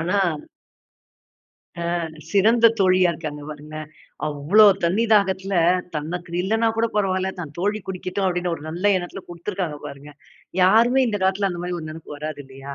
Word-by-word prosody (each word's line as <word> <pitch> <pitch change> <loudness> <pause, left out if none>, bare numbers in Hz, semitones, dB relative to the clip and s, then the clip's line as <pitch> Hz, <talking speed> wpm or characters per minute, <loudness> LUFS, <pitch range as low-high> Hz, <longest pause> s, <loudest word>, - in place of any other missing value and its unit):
ஆனா 185 +5 +1 1.6
அ, - - -3 0.5
சிறந்த 225 +4 +5
தோழியா 185 -2 +4
இருக்காங்க 150 -3 -6
பாருங்களேன். 155 +1 -8 0.4
அவ்வளோ 150 +9 +5 0.2
தண்ணி 200 +7 +2
தாகத்துல, 195 -1 +2 0.4
தனக்கு 170 +3 -4
இல்லனா 225 +3 +1
கூட 230 - +2
பரவாயில்லை 190 -1 0
தன் 155 -3 -8
தோழி 205 +4 0
குடிக்கட்டும் 185 +1 -2
அப்படின்னு 180 -1 -1
ஒரு 150 - -10
நல்ல 175 +4 -6
எண்ணத்துல 180 +2 -7
குடுத்துருக்காங்க 175 -3 -4
பாருங்க. 145 +1 -10 0.5
யாருமே 235 +7 +5
இந்த 205 -2 -1
காலத்துல 195 +1 +1
அந்த 175 -1 -5
மாதிரி 180 -1 -3
ஒரு 155 - -7
நினைப்பு 155 -1 -10
வராது 155 -1 -5
இல்லையா? 135 +1 -9
180 Hz, 145 wpm, -22 LUFS, 155-200 Hz, 1.6 s, சிறந்த